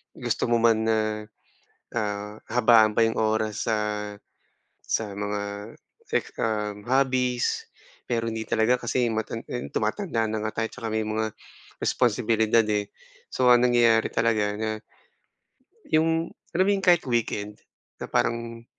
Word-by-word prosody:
gusto - - -1
mo 120 - +4
man 110 -1 +3
na, 110 - +3 1.0
ah, 105 0 -3
habaan 115 -3 +5
pa - - +5
'yong 115 - -1
oras 110 -1 0
sa 110 - +2 1.1
sa 105 -2 -1
mga 105 +1 -4 0.3
sef - - -1
um, 105 -2 -2
hobbies, 130 -2 +1 0.4
pero 115 -1 -1
hindi 110 0 -3
talaga 115 +3 +2
kasi 120 +1 +1
matan 110 +1 -3
yun 125 - -4
tumatanda 115 - -1
na 110 0 -2
nga 110 +1 -2
tayo 115 - 0
tsaka 115 -3 -6
may 110 0 0
mga 110 0 -1 0.5
responsibilidad, 115 -1 +2
eh. 105 -1 0 0.5
So, 125 -1 +3
ang 120 0 +6
nangyayari 120 -2 +4
talaga 105 -3 +1
na 110 - -1 1.2
yung 165 +1 +1 0.2
alam 185 - +4
mo - - +4
yung 195 - -2
kahit 175 -2 +5
weekend 105 -3 -2 0.4
na - - -5
parang 115 0 -1
115 Hz, 135 wpm, -26 LUFS, 110-120 Hz, 1.2 s, ang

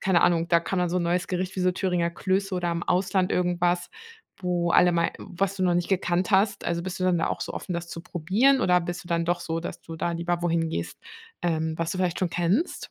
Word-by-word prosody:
keine 185 -3 +3
Ahnung, 170 -1 +3
da 170 -1 +4
kann 185 +2 -2
man 180 - +1
so 175 - -1
'n 180 - +1
neues 175 +1 0
Gericht 185 +1 -2
wie - - -1
so 180 0 +2
Thüringer 180 -2 0
Klöße 190 +2 -1
oder 175 -1 -1
im 170 0 -2
Ausland 185 +1 +1
irgendwas, 175 0 +1 0.5
wo 175 -1 0
alle 180 +1 +6
mal 170 -1 +1
was 195 +2 -2
du 190 - -2
noch 180 -1 +3
nicht 175 0 0
gekannt 180 -1 +1
hast? 200 +1 +2
Also, 170 0 -1
bist 185 +1 -5
du - - +1
dann 180 -2 +3
da 165 - +1
auch - - -2
so - - -5
offen, 180 - -5
das 170 0 -3
zu 165 - -6
probieren, 205 - +2
oder 180 -1 +4
bist 175 +2 -5
du - - -13
dann 170 -1 0
doch 175 0 0
so, 165 -1 -3
dass 170 - -7
du 165 - -8
da 170 +1 -1
lieber 170 +1 -1
wohin 165 -1 0
gehst, - - -4 0.4
ähm, 160 -2 0
was 165 0 -2
du 185 - -3
vielleicht 180 -2 0
schon 180 -2 0
kennst? 185 - 0
175 Hz, 255 wpm, -26 LUFS, 170-185 Hz, 0.5 s, alle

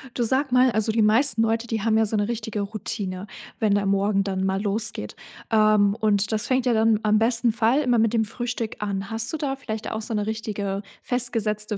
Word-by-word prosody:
Du 240 - 0
sag 260 +3 0
mal: 250 0 +4
Also, 220 0 +1
die 220 0 +1
meisten 225 +2 +3
Leute, 225 +1 0
die 225 -2 -2
haben 220 +1 +2
ja 220 - +3
so 215 - -2
'ne 205 -1 0
richtige 220 -3 -3
Routine, 200 -2 -5 0.3
wenn 215 -3 +2
der 205 -1 0
morgen 195 0 +1
dann 190 -1 -2
mal 190 0 -1
losgeht, 210 - -2 0.4
ähm, 215 -2 +4
und 210 -1 +1
das 215 -1 -1
fängt 260 -1 +1
ja 245 - +2
dann 220 -1 +3
am 215 0 +3
besten 230 +1 +2
Fall 235 +5 +2
immer 245 -4 +2
mit 225 0 +2
dem 225 -1 +2
Frühstück 235 0 -4
an. 195 -1 -3
Hast 225 0 -1
du - - -1
da 280 -3 -2
vielleicht 220 -5 -6
auch 220 - -4
so 225 - -5
'ne 210 -1 -1
richtige 205 -3 -3 0.2
festgesetzte 220 -4 0
220 Hz, 220 wpm, -24 LUFS, 205-230 Hz, 0.4 s, mal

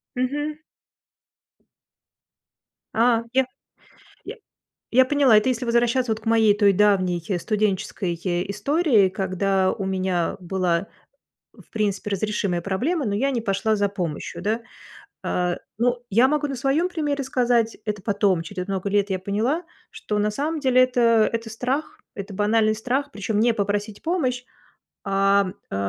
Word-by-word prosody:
Мгм. 290 +4 -2 2.4
А 230 0 +3
я 265 0 +3 0.8
я - - -7 0.6
я 260 +2 +5
поняла, 270 -5 +4
это 215 +5 +2
если 250 -1 -1
возвращаться 235 +1 +1
вот 220 0 -2
к - - -19
моей 225 -2 +4
той 205 -1 +5
давней 185 -3 +2 0.2
студенческой 200 -3 -1 0.4
истории, 220 - +2
когда 190 0 0
у 195 - -5
меня 185 -2 -1
была, 180 0 -1 0.7
в - - -19
принципе, 210 -1 -1
разрешимая 200 -3 -1
проблема, 250 - -1
но 200 - -1
я 270 +7 +1
не 250 -3 -1
пошла 215 +1 0
за 205 0 +1
помощью, 180 -7 -5
да. 220 +3 -1 0.6
А, 180 -1 -1 0.2
ну, 245 +1 +1
я 235 +6 +5
могу 300 +1 0
на 275 - -4
своем 275 +7 +1
примере 295 -5 -2
сказать, 245 -3 +1
это 210 -2 -3
потом, 200 -4 +1
через 180 +3 -6
много 195 0 -2
лет, 205 0 +1
я 190 - 0
поняла, 220 - -1 0.3
что 215 - -3
на 210 +1 +1
самом 305 +7 -2
деле- 255 -2 +4
это 235 -3 +3
это 230 0 -3
страх, 275 - -3
это 200 0 -7
банальный 215 +2 +2
страх, 255 +6 -2
причем 210 -2 -2
не 235 +2 +3
попросить 205 0 -2
помощь, 265 -8 -1 0.6
ам, 195 -1 +2 0.2
э, - - -3
215 Hz, 145 wpm, -23 LUFS, 195-255 Hz, 2.4 s, я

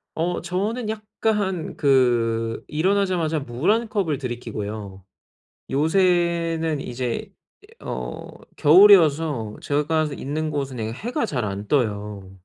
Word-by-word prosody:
어 175 +2 -1
저는 210 +7 -2
약간 210 -4 -2
그 120 -5 +2
일어나자마자 175 -1 +1
물 130 +8 -2
1 230 +1 +1
컵을 175 -10 0
들이키고요. 110 -6 -6 0.7
요새는 165 0 +1
이제 125 -2 -4 0.5
어 - - -6 0.3
겨울이어서 155 - +5
제가 150 +2 0
있는 155 +3 -3
곳은 140 -3 -3
네 110 -1 -3
해가 240 - -2
잘 125 - -2
안 100 0 -4
떠요. 105 -7 -1
150 Hz, 210 characters per minute, -23 LUFS, 120-180 Hz, 0.7 s, 겨울이어서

